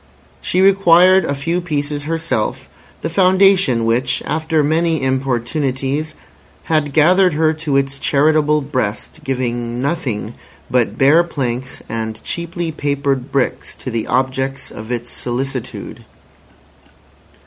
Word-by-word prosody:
She 185 - +1
required 190 -1 +5
a 140 - -1
few 165 +6 -1
pieces 145 -3 -2
herself, 160 -8 -2 0.3
the - - -2
Foundation 185 - +3
which, 115 +3 0
after 155 0 0
many 160 +2 +1
importunities, 135 +3 -1 0.5
had 155 -3 0
gathered 180 +4 +4
her 160 0 +2
to 155 -3 -1
its 135 0 -1
charitable 150 +1 +2
breast, 130 -7 -3
giving 120 -2 -2
nothing 125 -7 -2 0.4
but 115 -4 +1
bare 150 +6 +5
planks 130 -6 -4
and 110 -1 -4
cheaply 170 0 -4
papered 140 -3 -2
bricks 135 -2 -1
to 130 - -7
the 115 -1 -2
objects 130 +1 -1
of 110 +2 -8
its 120 0 -4
solicitude. 130 +1 -4
140 Hz, 115 wpm, -18 LUFS, 130-160 Hz, 0.5 s, required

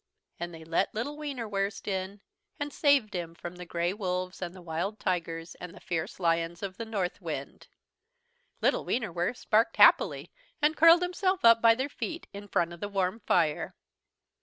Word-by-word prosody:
And 175 0 -4
they 165 -1 -10
let 165 +6 0
little 245 +7 -3
Wienerwurst 225 -10 -3
in, 195 +1 -3 0.4
and 290 0 -3
saved 280 -8 +3
him 170 -2 -4
from 175 +1 -8
the 180 -1 -9
grey 170 +2 -1
wolves 185 -2 -3
and 175 0 -5
the - - -10
wild 170 +6 -3
tigers 165 -2 -2
and 180 -1 -8
the - - -12
fierce 170 +1 -4
lions 165 0 0
of 190 -1 -5
the 230 - -4
Northwind. 200 -5 -4 0.9
Little - - +2
Wienerwurst 180 -1 -2
barked 220 +2 +3
happily - - +5 0.3
and 300 +2 +3
curled 330 +3 +7
himself 370 -2 0
up 230 0 +7
by 230 -1 +6
their 260 +3 -1
feet, 325 +3 -5
in 200 +1 -8
front 175 -3 0
of 170 - -11
the 205 - -4
warm 195 +1 -1
fire. 165 -8 +1
195 Hz, 170 wpm, -29 LUFS, 175-230 Hz, 0.9 s, curled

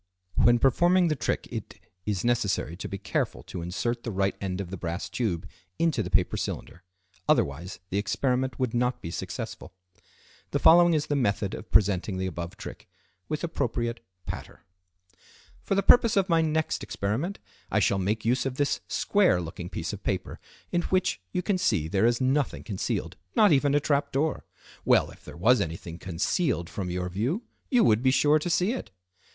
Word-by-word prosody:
When 120 0 +5
performing 175 +8 +4
the 155 - +1
trick 120 - -2
it, - - -6 0.3
is 100 -4 -1
necessary 105 -8 0
to 90 - -6
be 100 - -4
careful - - -2
to 90 - -7
insert 115 +8 -2
the 120 - -5
right 95 0 0
end 95 -1 -3
of 95 -3 -5
the - - -3
brass 85 +1 -4
tube 95 -9 -2 0.3
into 165 -2 +1
the - - -4
paper - - +2
cylinder, 90 - -5 0.5
otherwise 80 +7 +1
the 100 - +1
experiment 125 +5 0
would 130 -4 -1
not 125 +1 +1
be 85 - -4
successful. 90 - -6 0.7
The - - 0
following 175 0 +6
is 150 - +1
the 145 - -1
method 100 -6 0
of - - -7
presenting 95 0 +2
the 95 - -1
above 85 +1 -5
trick, - - -9 0.4
with 155 +1 -2
appropriate 120 -7 -2 0.3
"patter": - - -7 1.0
"For 195 - -1
the 195 - +2
purpose 230 -4 +6
of 195 -1 +3
my 165 -3 +3
next 160 0 0
experiment 125 - -2 0.3
I - - +2
shall 100 - +2
make 105 +4 -1
use 125 +2 +2
of 130 - -4
this 145 -1 +1
square 200 - +3
looking 85 +1 -6
piece - - -4
of - - -7
paper, - - -3 0.3
in 175 - +2
which 185 - 0
you 180 - -1
can 190 -1 0
see 95 - +1
there 100 +5 +2
is 120 0 +2
nothing 135 +2 0
concealed, 100 -5 -3 0.2
not 210 -4 +6
even 145 0 +3
a - - +5
trap 145 -1 0
door. 150 +3 -1 0.4
Well, - - +3
if - - -17
there 75 -1 -10
was 120 +8 +4
anything 85 +1 -5
concealed 95 - -1
from 95 -3 -4
your 90 0 -2
view, 120 - -1 0.3
you 245 -3 +4
would 110 0 +4
be 130 - +4
sure 145 +3 +4
to 165 - -3
see 180 +5 +2
it." 255 - -5
120 Hz, 185 wpm, -27 LUFS, 95-155 Hz, 1.0 s, following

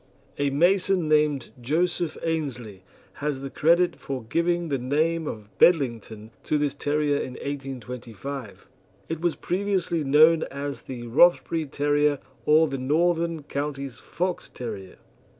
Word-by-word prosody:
A 145 0 +2
mason 180 +3 +2
named 150 -4 +2
Joseph 165 +4 0
Aynsley 130 - -3 0.4
has 145 -2 -2
the 135 -1 -6
credit 170 +3 +3
for 130 -3 -5
giving 170 +7 0
the 135 -2 0
name 155 +5 0
of 105 -4 -7
"Bedlington" 115 - +2
to 155 - 0
this 145 -2 0
terrier 145 0 0
in 130 - -4
1825. 130 -3 -7 0.4
It 165 -1 -3
was 175 -2 +1
previously 180 -3 -1
known 155 +4 +6
as 140 +1 -5
the 120 -2 -7
Rothbury 160 +4 +3
Terrier, 145 +1 +1 0.3
or 155 +1 +6
the 135 -2 -4
Northern 165 +3 +1
Counties 140 -4 -4
Fox 180 0 -3
terrier. 105 -6 -7
145 Hz, 130 wpm, -25 LUFS, 130-165 Hz, 0.4 s, known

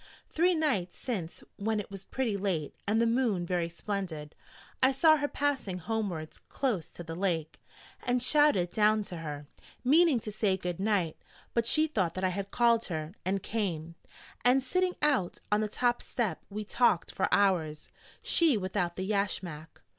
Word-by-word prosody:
Three 350 +2 +3
nights 260 - 0
since 190 -10 -4
when 215 +1 0
it 205 - -7
was 195 -1 -8
pretty 250 -6 -1
late, 185 -7 -2
and 215 +2 +2
the 230 - +4
moon 230 -6 +1
very 175 -1 -1
splendid, 170 -5 -5 0.5
I 260 +1 +5
saw 310 +3 +5
her 290 -1 0
passing 280 -11 -1
homewards 180 -5 -3
close 215 - -1
to 175 - -10
the 165 -1 -6
lake, 170 -4 -2 0.4
and 245 0 +1
shouted 275 - +4
down 215 0 +3
to 180 -3 -7
her, 150 -3 -6 0.4
meaning 300 0 +5
to 215 - -5
say 205 -2 +1
'Good 180 -2 -4
night'; 195 -6 0 0.4
but 230 -1 +1
she 310 0 +5
thought 195 - -1
that 185 - -3
I 185 - +3
had 195 +2 -4
called 235 0 +3
her, 155 -1 -4
and 190 +1 -1
came: 170 -7 -2 0.5
and 255 +2 +4
sitting 365 +6 0
out 270 -12 +2
on 210 +1 +3
the 215 - 0
top 240 +3 0
step 230 -6 -2
we 210 +1 -4
talked 215 -5 +2
for - - 0
hours, 170 -7 +2 0.4
she 320 -8 +4
without 185 -3 -2
the 190 - -3
yashmak. 190 -6 -3
200 Hz, 170 wpm, -30 LUFS, 175-245 Hz, 0.5 s, I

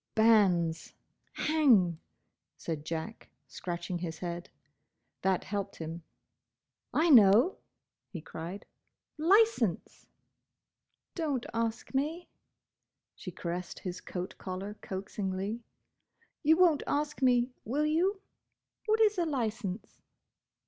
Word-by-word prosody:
"Banns—! 190 -8 +3 0.4
Hang!" 235 - +3 0.6
said 155 -2 -5
Jack, 165 +7 -5 0.2
scratching 175 0 -5
his 165 -2 -5
head. 175 -1 -5 0.7
That 190 -1 +1
helped 200 -1 -4
him. 165 +1 -6 0.9
"I 325 +1 +3
know!" 230 - +6 0.5
he 180 - -6
cried, 165 +5 -7 0.5
"Licence!" 355 - +2 1.1
"Don't 290 -8 -2
ask 230 +1 -2
me!" 310 +6 -1 0.9
She - - -8
caressed 175 0 -5
his 180 -1 -6
coat 180 0 -5
collar 190 +2 -5
coaxingly. 195 +3 -4 0.8
"You 315 +1 +4
won't 345 -5 +5
ask 295 0 -1
me, 250 -1 +3
will 285 +7 0
you? 365 +6 +1 0.7
What 435 +1 +3
is 425 -3 +4
a 345 - +2
licence?" 220 -7 -3
215 Hz, 100 wpm, -30 LUFS, 180-300 Hz, 1.1 s, know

